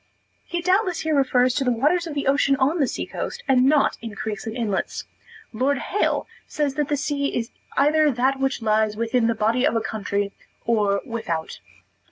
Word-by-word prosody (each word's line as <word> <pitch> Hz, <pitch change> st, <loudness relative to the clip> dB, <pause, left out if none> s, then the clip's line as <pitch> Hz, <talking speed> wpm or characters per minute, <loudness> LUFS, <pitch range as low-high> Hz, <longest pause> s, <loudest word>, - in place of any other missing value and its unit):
He 345 Hz, -1 st, -4 dB
doubtless 370 Hz, +1 st, +2 dB
here 315 Hz, 0 st, 0 dB
refers 255 Hz, -3 st, +3 dB
to 280 Hz, -, 0 dB
the 250 Hz, -, +2 dB
waters 305 Hz, +9 st, +1 dB
of 305 Hz, -, -6 dB
the 280 Hz, -, -2 dB
ocean 275 Hz, 0 st, +3 dB
on 275 Hz, +6 st, +1 dB
the 275 Hz, -, +3 dB
sea -, -, -3 dB
coast, -, -, -5 dB
and 255 Hz, -2 st, +4 dB
not 290 Hz, +1 st, +3 dB
in 225 Hz, -3 st, -7 dB
creeks 210 Hz, +1 st, -5 dB
and 225 Hz, +2 st, -4 dB
inlets. 210 Hz, -5 st, -2 dB, 0.5 s
Lord 265 Hz, +5 st, +1 dB
Hale 410 Hz, +9 st, 0 dB, 0.2 s
says 290 Hz, -3 st, -1 dB
that 295 Hz, 0 st, -1 dB
the 290 Hz, -, 0 dB
sea 280 Hz, 0 st, -1 dB
is 230 Hz, 0 st, -3 dB, 0.3 s
either 305 Hz, +2 st, +4 dB
that 265 Hz, +1 st, +1 dB
which 270 Hz, -3 st, -1 dB
lies 215 Hz, -1 st, +1 dB
within 230 Hz, +1 st, +1 dB
the 230 Hz, -, +1 dB
body 225 Hz, +4 st, +1 dB
of 250 Hz, -, +2 dB
a -, -, +3 dB
country 200 Hz, -2 st, -2 dB, 0.3 s
or 205 Hz, -4 st, +2 dB
without. 220 Hz, -, -4 dB
260 Hz, 195 wpm, -23 LUFS, 225-290 Hz, 0.5 s, and